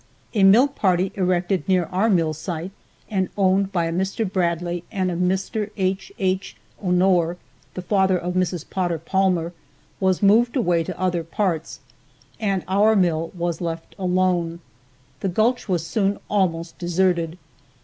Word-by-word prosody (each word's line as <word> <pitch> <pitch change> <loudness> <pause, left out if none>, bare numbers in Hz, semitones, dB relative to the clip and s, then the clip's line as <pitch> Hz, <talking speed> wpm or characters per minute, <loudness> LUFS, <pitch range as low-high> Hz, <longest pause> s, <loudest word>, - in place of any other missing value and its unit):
A 210 - +1
mill 215 +8 +7
partly 190 -9 +1
erected 185 0 0
near 180 -2 +3
our 195 +5 +2
mill 165 -6 +2
site, 165 +3 -5 0.4
and 190 -3 -1
owned 195 0 +2
by 175 -3 0
a 165 - -2
Mr. 190 +5 -1
Bradley 175 -2 -1
and 190 -4 -1
a - - -3
Mr. 190 +4 -1
H. 190 0 -1
H. 185 - -1 0.2
Honore, 180 -2 +2 0.4
the 185 - -5
father 190 -1 +2
of 180 +1 -3
Mrs. 180 -3 -1
Potter 175 -3 -1
Palmer, 175 0 0 0.5
was 190 0 +1
moved 230 +5 +4
away 175 -10 +2
to - - -7
other 180 -2 0
parts, 165 - -2 0.6
and 195 -4 0
our 205 +4 +4
mill 165 -4 +1
was 170 -1 -2
left 165 -1 -5
alone. 180 -2 0 0.6
The 195 - -1
gulch 220 +5 +1
was 175 -3 0
soon 200 +1 0
almost 170 -5 0
deserted. 175 -1 0
185 Hz, 150 wpm, -22 LUFS, 170-195 Hz, 0.6 s, mill